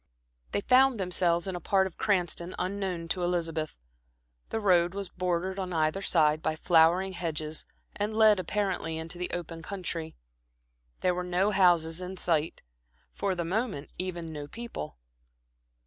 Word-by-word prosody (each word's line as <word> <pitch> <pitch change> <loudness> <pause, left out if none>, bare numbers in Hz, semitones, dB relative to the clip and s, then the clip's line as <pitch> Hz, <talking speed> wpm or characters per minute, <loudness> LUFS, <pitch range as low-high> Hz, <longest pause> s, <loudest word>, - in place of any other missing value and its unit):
They - - 0
found 260 +2 +5
themselves 175 -2 +1
in 190 -2 -3
a - - -3
part 190 +3 +2
of 190 - -6
Cranston 180 -4 0
unknown 185 -3 -2
to 180 - -1
Elizabeth. 165 -3 -1 0.7
The 225 - -1
road 180 -3 +3
was 200 -2 -4
bordered 180 +1 -2
on 185 -1 -3
either 155 +4 +1
side 155 -4 +3
by 155 - 0
flowering 175 +3 +4
hedges 160 -3 -3 0.3
and 210 +1 -1
led 215 -3 +6
apparently 185 -3 -1
into 165 +2 -5
the 180 - -2
open 165 -1 -5
country. 165 -3 -4 0.9
There 180 - +2
were 180 0 -2
no 180 +3 +1
houses 175 -3 +4
in 185 +1 -6
sight; 165 -3 0 0.5
for 195 -2 -1
the 170 -1 -2
moment, 195 - -2
even 175 -3 -4
no 145 -1 -6
people. 230 - -7
180 Hz, 150 wpm, -29 LUFS, 165-190 Hz, 0.9 s, led